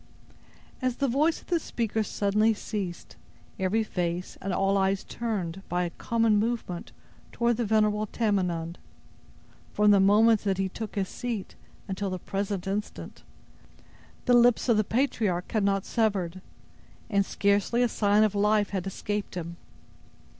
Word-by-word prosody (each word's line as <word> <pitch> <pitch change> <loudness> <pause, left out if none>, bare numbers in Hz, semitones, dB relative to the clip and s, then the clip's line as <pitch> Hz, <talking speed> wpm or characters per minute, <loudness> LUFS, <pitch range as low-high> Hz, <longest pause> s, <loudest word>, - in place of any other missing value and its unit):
As 255 -1 0
the 275 - 0
voice 295 +6 +1
of - - -21
the 345 -2 +2
speaker 225 -6 -2
suddenly 215 +1 +1
ceased, 195 -5 -5 0.4
every 195 +4 +1
face 180 -3 -3
and 195 - -3
all 195 +1 +1
eyes 195 0 +1
turned, 195 -6 -4
by 180 +1 0
a 175 - -3
common 225 +2 +1
movement, 220 -6 -3 0.4
toward 235 -1 +1
the 240 - 0
venerable 215 0 +2
Tamenund. 180 -7 -1 0.9
From 210 0 +4
the 200 - +6
moment 210 +3 +5
that 195 -2 0
he 190 0 0
took 220 +3 -7
his 195 -2 0
seat, 230 -4 -5 0.3
until 195 +1 -3
the 185 - -3
present 195 +1 -3
instant, 200 +2 -5 1.0
the 245 - +4
lips 240 0 +5
of 230 -3 +4
the 215 - +3
patriarch 215 -6 0
had 215 -2 +1
not 195 -1 +1
severed, 190 -5 0 0.7
and 200 -3 +2
scarcely 200 +5 +1
a - - +4
sign 210 -1 +3
of 215 -2 +2
life 210 0 +2
had 195 -2 -2
escaped 205 +1 -4
him. 170 -1 -5
205 Hz, 150 wpm, -27 LUFS, 190-225 Hz, 1.0 s, the